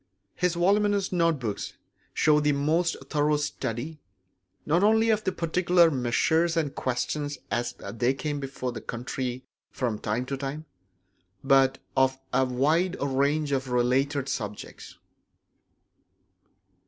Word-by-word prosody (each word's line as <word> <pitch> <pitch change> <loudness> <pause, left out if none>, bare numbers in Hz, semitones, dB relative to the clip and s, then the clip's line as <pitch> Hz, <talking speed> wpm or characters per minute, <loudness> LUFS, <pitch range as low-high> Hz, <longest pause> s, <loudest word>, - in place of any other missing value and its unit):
His 180 -1 0
voluminous 200 +2 +2
note 165 -3 +2
books 110 -6 -4 0.4
show 150 -1 +3
the 150 0 +2
most 160 +5 +1
thorough 150 0 +1
study, 145 0 -4 0.7
not 165 +4 +2
only 220 +2 +4
of 215 -1 +1
particular 170 0 +3
measures 160 +6 +1
and 150 -4 0
questions 145 +3 -2
as 120 0 -1
they 120 +3 -1
came 145 +1 -3
before 135 -2 -4
the 115 -2 -7
country 125 +1 -4 0.2
from 115 -5 -2
time 110 +4 -2
to 135 +1 -4
time, 140 +3 -5 0.8
but 135 -1 +4 0.2
of 130 0 +3 0.2
a 130 +1 +3
wide 155 +9 +1
range 140 +2 0
of 135 -1 -1
related 130 +3 +1
subjects. 105 -6 -6
140 Hz, 120 wpm, -27 LUFS, 130-165 Hz, 0.8 s, only